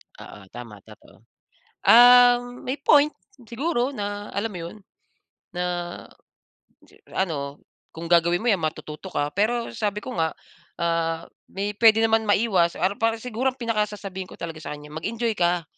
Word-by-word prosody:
Oo, 95 -2 -13
tama, 115 -4 -10
totoo. 110 0 -18 0.7
Ah, 245 +1 +8
may 245 +2 -6
point 290 +1 +5 0.3
siguro 255 +2 -1
na 205 -2 -5
alam 205 +3 -2
mo 180 - -6
'yon, 170 - -10 0.8
na 180 0 -2 1.5
ano, 145 -6 -2 0.3
kung 165 +1 -7
gagawin 170 +2 +3
mo 240 - +2
'yan, 195 - 0
matututo 155 +2 -5
ka. 145 -3 -2
Pero 230 +5 0
sabi 210 -1 -2
ko - - -6
nga, 160 -1 0 0.5
ah, 165 -1 -1 0.3
may 200 +2 -3
puwede 225 +1 +5
naman 225 0 +2
maiwas, 195 -5 +2
para, 185 +4 0
para 225 0 +1
siguro 250 +3 -2
pinaka 230 -4 0
sasabihin 190 -3 -7
ko - - -12
talaga 165 -1 -6
sa - - -5
kanya, 150 0 -13
mag-enjoy 225 +9 -2
ka. 175 -1 +1
200 Hz, 150 wpm, -24 LUFS, 165-230 Hz, 1.5 s, Ah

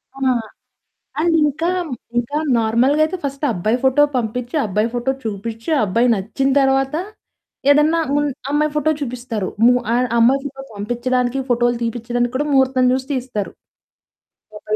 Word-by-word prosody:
ఆ! - - -11 1.0
అండ్ 330 0 +2
ఇంకా 320 +4 0 0.5
ఇంకా 240 +5 -2 0.2
నార్మల్‌గయితే 265 +9 +2
ఫస్ట్ 275 +1 -3
అబ్బాయి 215 +5 0
ఫోటో 265 +2 +4
పంపిచ్చి 245 +4 -3
అబ్బాయి 210 +2 0
ఫోటో 245 +2 -1
చూపిచ్చి 225 +5 -5
ఆ - - +2
అబ్బాయి 230 +6 +2
నచ్చిన 220 +7 -1
తర్వాత 270 +1 +2 0.8
ఏదన్నా 300 +3 +4
ముం 290 0 +2 0.2
అమ్మాయి 300 +1 +1
ఫోటో 300 +1 +1
చూపిస్తారు. 240 -6 -4 0.2
ము 245 - +7 0.2
అన్ 250 +1 +1
అమ్మాయి 260 +4 +4
ఫోటో 270 -1 -7
పంపిచ్చడానికి 245 +4 -1
ఫోటోలు 240 0 +2
తీపిచ్చడానికి 240 +1 -2
కూడా 295 +3 0
ముహూర్తం 265 -1 +3
జూసి 260 0 -1
తీస్తారు. 250 -6 -3 1.0
ఫోటో 210 0 -13
250 Hz, 135 wpm, -19 LUFS, 230-275 Hz, 1.0 s, ము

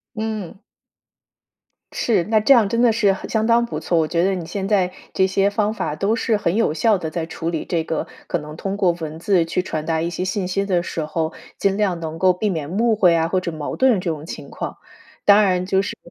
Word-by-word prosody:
嗯。 215 -4 -4 1.3
是， 210 -7 +1
那 220 +1 +2
这 215 +6 +5
样 225 -5 +4
真 230 +3 0
的 240 -2 +5
是 210 -3 +3
很 190 - -6
相 220 -1 0
当 235 +1 +3
不 - - -5
错。 170 - +1
我 160 - +2
觉 170 +2 0
得 190 +2 +2
你 170 - -5
现 195 +2 -4
在 190 -4 +2 0.2
这 190 - +3
些 195 +1 +2
方 210 +1 0
法 150 - -3
都 200 +7 +1
是 225 -1 +1
很 175 -4 0
有 225 -7 +2
效 215 +6 +3
地 165 -4 -4
在 160 0 -3
处 165 0 -4
理 165 -2 -3
这 170 -2 -1
个 160 0 -3 0.2
可 175 - 0
能 150 0 -9
通 195 +3 -3
过 185 -3 +3
文 160 -2 -6
字 180 -1 +2
去 165 +2 -1
传 155 -4 -4
达 160 0 0
一 165 - -1
些 180 +1 -3
信 185 0 -2
息 195 +2 -1
的 180 -3 +1
时 165 - -4
候， 160 +1 -2 0.3
尽 195 0 +1
量 195 -5 0
能 160 -1 -5
够 185 +1 +4
避 205 +4 -1
免 160 -5 -3
误会 210 -3 +3
啊 165 0 +2
或 185 +2 0
者 180 - -3
矛 155 -3 -5
盾 255 -7 +3
这 180 - -4
种 155 -1 -5
情 - - -8
况。 - - -5 0.5
当 205 +1 +7
然 185 -2 +1
就 190 +1 +2
是 - - -5
185 Hz, 265 characters per minute, -21 LUFS, 165-210 Hz, 1.3 s, 当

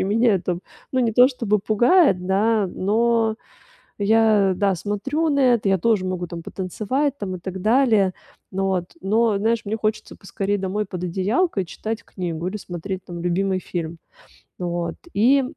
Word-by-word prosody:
И - - +1
меня 220 +3 +3
это, 180 -2 -1 0.3
ну, 260 - +2
не 230 -2 +1
то 250 +3 +7
чтобы 230 -5 0
пугает, 215 - +3
да, 205 +2 +2
но 220 +4 +1 0.6
я, 210 -2 +4
да, 200 -1 +2
смотрю 270 - -1
на 280 - +1
это, 210 -4 +1
я 195 - +3
тоже 210 0 +2
могу 185 -1 -2
там 170 -1 -7
потанцевать 250 - -2
там 190 -3 -4
и - - -8
так 190 +1 -6
далее. 220 -5 +3 0.4
Ну 195 0 -1
вот, 185 -2 0 0.2
но, 215 +1 +2
знаешь, 225 +2 +1
мне 215 +2 -2
хочется 215 0 -2
поскорей 200 +1 -2
домой 200 +2 -2
под 180 -2 -6
одеялко 200 - 0
и - - -5
читать 220 +6 -5
книгу, 175 -2 -4
или 210 - -3
смотреть, 185 0 -6
там, 175 -1 -7
любимый 185 +2 0
фильм. 170 -2 -5 0.6
Вот, 175 -1 -2 0.2
и 260 +6 +4
200 Hz, 170 wpm, -22 LUFS, 185-225 Hz, 0.6 s, то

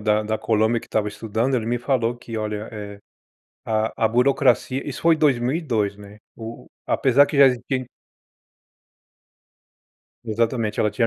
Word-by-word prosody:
da 105 0 +2
da 110 +1 -1
Colômbia, 110 +1 +1
que - - -14
estava 110 -1 -1
estudando, 110 +5 -2
ele 115 -3 -1
me 120 +1 0
falou 120 -2 0
que: 115 -1 -8
"Olha, 105 0 -4
eh, 105 -1 -7 0.7
a 110 0 0
a - - +5
burocracia", 130 +2 +2
isso 140 - -6
foi 165 0 +5
2002, 125 - 0
né. 105 0 -13 0.2
O 115 0 -9
o - - -20 0.2
apesar 135 +2 +4
que 145 - -4
já 140 - +9
existia 130 +1 -2 2.4
Exatamente, 115 -1 -1
ela 105 - +2
tinha 115 +3 +1
115 Hz, 150 wpm, -22 LUFS, 110-130 Hz, 2.4 s, já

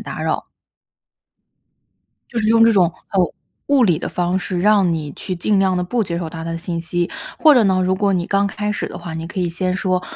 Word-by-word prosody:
打 - - -6
扰。 - - -2 1.8
就 235 - -3
是 215 -1 +1
用 225 0 +6
这 230 - +5
种， 185 -4 +4 0.3
呃， 195 - +3 0.5
物 280 -2 +4
理 175 -6 +2
的 - - -4
方 180 +1 -1
式， 180 -1 -3
让 200 -3 +4
你 150 -3 -5
去 185 - -5
尽 200 +4 +1
量 190 -1 +2
地 180 - 0
不 230 +6 -1
接 170 -1 -3
受 165 -2 -4
他 165 -1 -7
的 165 0 -3
信 170 0 -4
息。 175 +1 -2 0.3
或 310 - +7
者 240 - +5
呢， 190 -2 +2
如 185 +1 +1
果 200 0 +1
你 175 -2 0
刚 200 0 +2
开 210 0 -3
始 210 - -2
的 - - -8
话， 170 -1 -7
你 165 0 -5
可 185 +2 -5
以 175 - 0
先 185 +2 -1
说： 185 -1 0
185 Hz, 250 characters per minute, -19 LUFS, 175-205 Hz, 1.8 s, 或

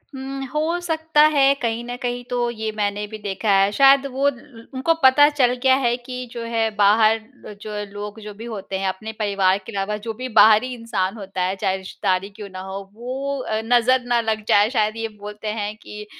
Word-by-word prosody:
उम, 270 +1 -6
हो 320 +3 0
सकता 320 -3 +1
है, 275 -1 +5
कहीं 235 -3 -2
न 245 - -5
कहीं 245 0 -3
तो 240 -1 0
ये 220 -1 -4
मैंने 205 0 -1
भी 215 +1 -8
देखा 205 0 -3
है। 195 +1 +3
शायद, 275 +4 +5
वो 275 +1 +2
ल 235 -3 -16
उनको 265 +6 +1
पता 265 +3 +7
चल 265 -5 +2
गया 260 -1 +5
है 240 0 +2
कि 250 +1 -8
जो 235 -1 -6
है, 230 -1 0
बाहर 215 +2 +4 0.3
अ, - - -8
जो 215 -1 -6 0.2
लोग 205 +1 -7
जो 210 0 -8
भी - - -6
होते 200 -4 -5
हैं, 195 - -1
अपने 215 +4 -4
परिवार 195 -2 +2
के - - -8
अलावा, 200 0 -2
जो 225 - -2
भी 255 +4 -6
बाहरी 220 +4 +6
इंसान 230 -5 -2
होता 195 -2 -5
है, 185 +2 0
चाहे 190 -1 -1
रिश्तेदारी 190 0 -2
क्यों 205 0 -10
ना 185 0 -9
हो, 190 +1 -6 0.2
वो 265 +5 -4
अ, 220 -2 -2
नज़र 245 +2 +3
ना 240 -1 +2
लग 220 -1 -2
जाए, 205 +1 +4
शायद 215 -3 0
ये 225 - -2
बोलते 210 +1 -8
हैं 205 +1 -3
कि, 210 -1 -10
220 Hz, 215 wpm, -22 LUFS, 205-255 Hz, 0.3 s, पता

